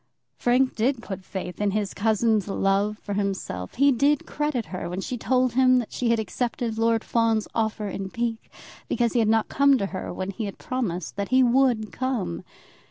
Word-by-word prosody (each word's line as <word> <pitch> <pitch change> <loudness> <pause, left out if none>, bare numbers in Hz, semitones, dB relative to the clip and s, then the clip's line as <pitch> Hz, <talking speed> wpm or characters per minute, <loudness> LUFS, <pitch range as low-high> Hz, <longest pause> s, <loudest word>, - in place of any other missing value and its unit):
Frank 255 +2 +2
did 235 +2 0
put 190 -1 -6
faith 185 0 -6
in 205 - +2
his 205 -1 -1
cousin's 220 -1 +1
love 200 +1 +1
for 205 - -6
himself. 195 - -3
He 280 +2 +5
did 280 +3 +2
credit 295 -6 -2
her 180 - -4
when 180 +2 -4
she 250 +6 -3
told 255 0 +1
him 255 0 +5
that 240 -3 -2
she 245 - 0
had 230 - +3
accepted 225 +1 -2
Lord 230 0 +2
Fawn's 225 -2 +1
offer 220 -1 -1
in 195 0 -4
pique, 230 +1 -3 0.4
because 235 -2 0
he 240 - +2
had 225 - +3
not 225 0 +3
come 280 -1 +4
to 200 - -1
her 185 - -4
when 190 +1 -4
he 215 +3 -4
had 200 - -6
promised 220 - -3
that 200 -1 -2
he 260 0 +5
would 240 -3 +2
come. 250 - -2
225 Hz, 195 wpm, -25 LUFS, 200-250 Hz, 0.4 s, He